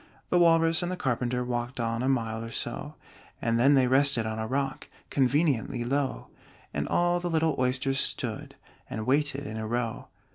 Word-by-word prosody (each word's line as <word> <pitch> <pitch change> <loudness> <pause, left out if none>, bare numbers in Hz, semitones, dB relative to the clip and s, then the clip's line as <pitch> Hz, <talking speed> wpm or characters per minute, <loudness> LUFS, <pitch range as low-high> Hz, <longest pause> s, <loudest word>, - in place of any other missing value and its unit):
The 180 - +4
Walrus 165 0 +4
and 175 0 -2
the 185 - -3
Carpenter 125 -3 -1
Walked 120 +1 -3
on 115 0 -1
a 130 - +1
mile 115 -4 -1
or 115 - -6
so, - - -4 0.4
And 115 0 0
then 140 +4 +5
they 130 -1 +4
rested 130 -2 +3
on 110 0 -3
a 110 - -2
rock 135 +2 -2 0.2
Conveniently 135 -3 +1
low: 135 +2 -2 0.4
And - - -2
all 175 0 +2
the 175 0 -3
little 160 -1 +1
Oysters 130 +2 +1
stood - - -2 0.3
And 110 - -4
waited 140 +1 +1
in 110 - -5
a 110 0 -4
row. 115 0 -2
130 Hz, 180 wpm, -28 LUFS, 120-145 Hz, 0.4 s, then